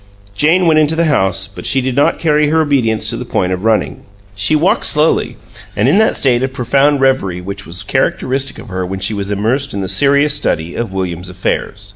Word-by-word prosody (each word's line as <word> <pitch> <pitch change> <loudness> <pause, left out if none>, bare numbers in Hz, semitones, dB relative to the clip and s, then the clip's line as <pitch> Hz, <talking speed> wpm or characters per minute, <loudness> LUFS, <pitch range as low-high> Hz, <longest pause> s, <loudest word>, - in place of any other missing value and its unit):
Jane 170 - +3
went 160 -2 +4
into 155 +1 +2
the 170 +1 +1
house, 95 -10 +1
but 100 - -6
she 135 - +2
did 130 -1 -2
not 140 - +2
carry 150 -2 +1
her 160 +1 +2
obedience 130 -8 +1
to 115 - -2
the 125 - -5
point 95 -6 -1
of 90 +1 -5
running. 110 -1 0 0.3
She 100 +9 +1
walked 165 +5 +2
slowly, 150 +2 +1 0.4
and 105 +4 +1
in 155 +10 +4
that 220 - +2
state 125 -3 +2
of 130 0 -1
profound 135 +3 +1
reverie 130 -10 +1
which 95 +2 -7
was 85 +2 -5
characteristic 135 +1 -1
of - - -11
her 95 -1 -3
when 95 +1 -5
she 95 +3 -1
was 100 -1 -4
immersed 115 +6 -1
in 100 - -3
the 95 - -3
serious 140 +8 +3
study 85 - -2
of 115 -4 -4
William's 90 -2 -4
affairs. 100 +2 -3
120 Hz, 215 wpm, -15 LUFS, 95-145 Hz, 0.4 s, went